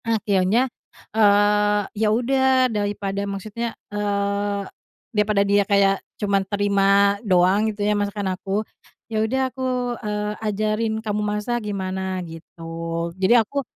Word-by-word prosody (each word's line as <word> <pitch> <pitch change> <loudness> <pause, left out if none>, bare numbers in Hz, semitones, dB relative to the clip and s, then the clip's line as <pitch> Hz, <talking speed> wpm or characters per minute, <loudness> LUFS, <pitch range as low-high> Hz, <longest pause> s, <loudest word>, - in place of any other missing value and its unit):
Akhirnya, 215 0 +2 0.5
eee, 205 -1 +4 0.2
ya 220 - +3
udah 260 +3 +3
daripada 205 -1 -2
maksudnya, 215 +4 -5 0.2
eee, 200 0 -1 0.5
daripada 210 -1 +2
dia 200 0 +3
kayak 195 -1 +3 0.2
cuma 200 -1 +1
terima 200 0 +2
doang 195 +1 +3
gitu 205 -1 -3
ya 210 - +2
masakan 205 -2 -1
aku, 195 +3 -3 0.5
"Ya 215 -1 0
udah 250 +5 0
aku, 260 - -8 0.4
eee, 210 -1 -2
ajarin 215 +1 -1
kamu 210 0 -1
masak 210 +3 -1
gimana?" 190 -1 -3
gitu. 165 0 -12 0.6
Jadi 190 +5 +4
aku, 240 +5 +1
205 Hz, 120 wpm, -22 LUFS, 200-215 Hz, 0.6 s, eee